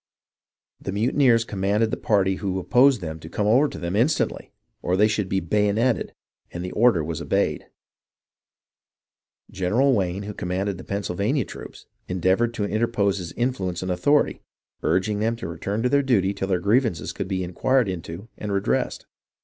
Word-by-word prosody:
The - - -4
mutineers 115 +2 +3
com 100 -4 -6
manded 105 +3 +2
the - - 0
party 95 -3 +1
who 95 -2 -2
opposed 125 +5 +4
them 80 -2 -5
to 80 - -10
come 105 - -2
over 125 +8 +4
to - - -8
them 85 +2 -3
instantly 120 +1 0 0.3
or 90 +1 0
they 105 +2 +5
should 105 -3 -1
be 95 - +1
bayoneted, 105 +6 0 0.3
and 85 +1 -6
the 90 - -5
order 110 -8 +3
was 80 0 -4
obeyed. - - 0 1.8
General 115 +10 +2
Wayne, 95 -2 -1
who 105 +1 -6
commanded 95 +1 -3
the - - -8
Pennsylvania 100 - -1
troops, - - -10 0.2
endeavoured 95 +6 +1
to 105 - -1
interpose 105 -2 0
his 85 -2 -6
influence 95 -8 -2
and 95 - -2
authority, 145 +12 +2 0.4
urging 105 +3 +1
them 115 +2 0
to 115 - -6
return 100 +7 -3
to 125 - +2
their 140 +1 +3
duty 100 -8 +2
till 95 -1 -3
their 95 -2 +1
grievances 105 - +1
could 100 - -4
be 95 -1 -2
inquired 125 +7 +1
into 90 +2 -6
and 105 - -4
redressed. 100 0 -1
100 Hz, 170 wpm, -24 LUFS, 95-115 Hz, 1.8 s, they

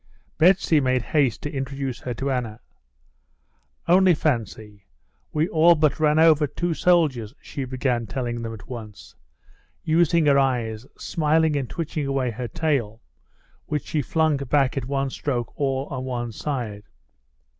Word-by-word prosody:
Betsy 170 -2 +4
made 130 -2 +1
haste 135 -6 0
to 145 - -4
introduce 135 -1 -4
her 125 - -4
to 135 +4 -2
Anna. 120 -4 -3 1.3
"Only 180 0 +5
fancy, 110 -8 -3 0.4
we 155 +2 +1
all 170 +2 +5
but 155 -1 +1
ran 150 0 +3
over 160 -2 +5
two 175 +5 -2
soldiers," 145 -10 +1
she 140 - -6
began 125 -2 -1
telling 120 +1 -3
them 115 -1 -4
at 110 -4 -10
once, 105 -9 -9 0.7
using 165 0 +3
her 140 -1 +5
eyes, 120 -3 -1
smiling 160 -1 +1
and 135 -4 -2
twitching 155 -3 -3
away 135 -3 0
her 120 +2 -5
tail, 120 -5 -1 0.7
which 150 -1 -2
she 155 - -1
flung 155 +1 +1
back 140 0 +1
at 135 -3 -3
one 135 0 -1
stroke 120 -6 -3
all 135 -1 -1
on 130 -2 -4
one 120 -2 -3
side. 115 -5 -4
135 Hz, 145 wpm, -24 LUFS, 120-155 Hz, 1.3 s, Only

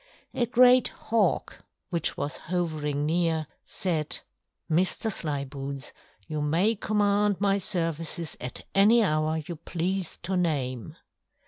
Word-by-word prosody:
A 240 - 0
great 250 +1 +6
Hawk, 220 -6 -1 0.3
which 170 -2 0
was 145 - -3
hovering 155 -5 -2
near, 165 -1 +1 0.2
said: 160 -5 -1 0.5
"Mr. 180 +6 +1
Slyboots, 140 -4 -4 0.4
you 155 -1 -3
may 170 +9 +2
command 205 -1 +2
my 200 0 +2
services 165 -4 -1
at 125 -1 -3
any 220 +4 +6
hour 155 -3 +1
you 170 - -5
please 175 +3 -2
to 190 +2 -1
name." 130 - -1
170 Hz, 115 wpm, -27 LUFS, 150-200 Hz, 0.5 s, great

